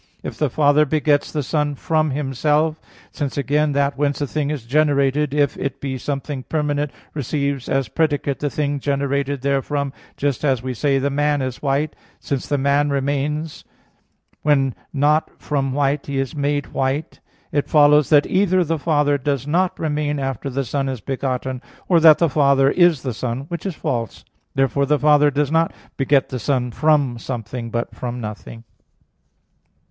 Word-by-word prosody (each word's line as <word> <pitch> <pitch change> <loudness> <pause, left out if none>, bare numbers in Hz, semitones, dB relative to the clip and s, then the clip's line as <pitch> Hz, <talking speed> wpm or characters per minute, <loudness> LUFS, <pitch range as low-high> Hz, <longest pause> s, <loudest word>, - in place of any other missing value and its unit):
If - - -5
the 150 - 0
Father 145 +3 +4
begets 150 0 +1
the 150 -2 -2
Son 150 +1 -1
from 155 +1 0
Himself, 150 +3 0 0.3
since 145 -2 -4
again 145 +2 +1
that 140 0 0
whence 145 -1 0
a 145 - 0
thing 145 +1 -2
is 145 -6 -4
generated, 145 +1 +2
if 145 -1 +1
it 135 -1 -4
be 135 -1 -3
something 140 0 -4
permanent, 150 0 -1 0.2
receives 140 -1 -2
as 135 -2 +1
predicate 145 +1 0
the 145 - -1
thing 145 0 -1
generated 140 -1 -1
therefrom 140 0 -1 0.2
just 140 -2 -1
as 130 -5 +1
we 130 0 -3
say, 135 +3 +1
"The 140 +1 0
man 145 0 +1
is 130 -1 -5
white," 145 +2 0 0.2
since 140 -3 -3
the 145 - 0
man 140 +2 +2
remains, 145 +3 -2 0.8
when 135 -3 +2 0.2
not 150 +2 +2
from 135 -3 -1
white 140 +1 0
he 140 -1 -3
is 135 +2 -2
made 145 0 -1
white 135 +4 -2 0.3
it 145 - -1
follows 150 -1 +5
that 150 -2 +5
either 185 -1 +2
the 165 -1 -2
Father 145 -2 +2
does 140 -1 -1
not 175 +5 +1
remain 150 -1 -1
after 135 -1 -3
the 135 +1 -2
Son 135 +2 -1
is 130 -2 -4
begotten, 130 +1 -3 0.3
or 175 -3 +5
that 160 -2 +8
the 170 - +3
Father 140 -2 +3
is 175 -6 +3
the 130 -3 -2
Son, 120 +2 -3
which 170 +3 -4
is 185 - -4
false. 115 -6 -3 0.3
Therefore 135 +1 +1
the 150 +1 +3
Father 150 0 +5
does 145 0 0
not 165 +1 +2 0.2
beget 135 0 +2
the 130 - -4
Son 125 -2 0
from 145 -4 +2
something, 120 -1 -5
but 120 +1 -3
from 125 0 -5
nothing. 115 +1 -8
140 Hz, 170 wpm, -21 LUFS, 135-150 Hz, 0.8 s, that